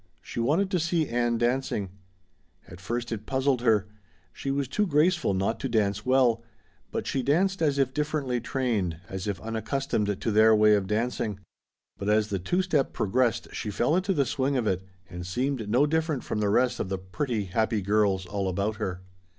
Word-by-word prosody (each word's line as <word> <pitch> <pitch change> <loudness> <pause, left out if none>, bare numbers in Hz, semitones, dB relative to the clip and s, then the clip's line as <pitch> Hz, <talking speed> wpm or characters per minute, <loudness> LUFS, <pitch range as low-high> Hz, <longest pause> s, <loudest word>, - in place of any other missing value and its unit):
She - - -6
wanted 160 +12 +1
to 180 - +2
see 165 -1 +1
Ann 120 0 0
dancing. 120 -5 -1 0.8
At 85 +2 -12
first 120 +4 -3
it 110 -1 -5
puzzled 130 -1 +1
her; 110 -4 +3 0.5
she 135 - -5
was 140 0 0
too 205 +10 0
graceful 155 - +2
not 95 +4 0
to 135 - -3
dance 105 -2 +1
well, 125 -3 +4 0.5
but - - -3
she 135 - -1
danced 180 +9 +1
as 145 -3 +2
if 135 -2 +1
differently 145 -4 -1
trained, 110 - -1
as 95 +1 -5
if 100 -4 -2
unaccustomed 110 -1 -2
to 115 - -1
their 110 +1 +6
way 105 0 +5
of 100 -2 +1
dancing. 110 -1 -1 0.6
But 100 - -2
as 105 0 +3
the 100 -2 -1
two 175 - 0
step 150 -7 0
progressed 115 +2 0
she 105 - -4
fell 120 +9 +1
into 190 +1 +1
the 140 -3 +2
swing 135 +2 0
of 120 - 0
it 95 -3 0 0.3
and 90 -1 -7
seemed 120 +4 -2
no 125 +7 +4
different 160 -2 0
from 105 - -3
the 105 -1 +1
rest 125 +4 +2
of - - -2
the 95 - -1
pretty, 110 +4 -3
happy 110 +2 0
girls 100 -2 +2
all 95 +1 -2
about 100 +3 -1
her. 90 -2 -4
115 Hz, 190 wpm, -27 LUFS, 105-140 Hz, 0.8 s, their